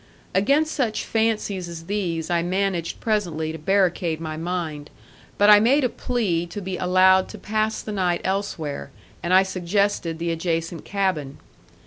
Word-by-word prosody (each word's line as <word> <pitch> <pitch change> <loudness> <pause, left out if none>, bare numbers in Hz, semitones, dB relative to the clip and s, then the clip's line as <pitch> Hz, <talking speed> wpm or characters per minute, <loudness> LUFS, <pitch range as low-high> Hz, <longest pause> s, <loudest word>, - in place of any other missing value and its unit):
Against 285 +11 +2
such 240 -7 -1
fancies 215 -5 -1
as 165 -1 -8
these 175 -4 -2
I 170 -1 +2
managed 185 -1 -1
presently 175 -8 -1
to 160 - -7
barricade 175 -2 +1
my 155 -1 -5
mind, 160 -3 -4 0.5
but 205 - +4
I 210 - +9
made 265 +7 +3
a 250 - +2
plea 200 -10 -1
to 170 +4 -6
be 190 -1 -4
allowed 185 +1 +4
to - - -8
pass 215 +1 -1
the 215 - -5
night 180 -4 0
elsewhere, 190 -7 -3 0.3
and 175 - -2
I 190 +1 +7
suggested 185 -2 -1
the 170 +1 -2
adjacent 165 0 -2
cabin. 185 -9 -1
185 Hz, 155 wpm, -23 LUFS, 165-205 Hz, 0.5 s, I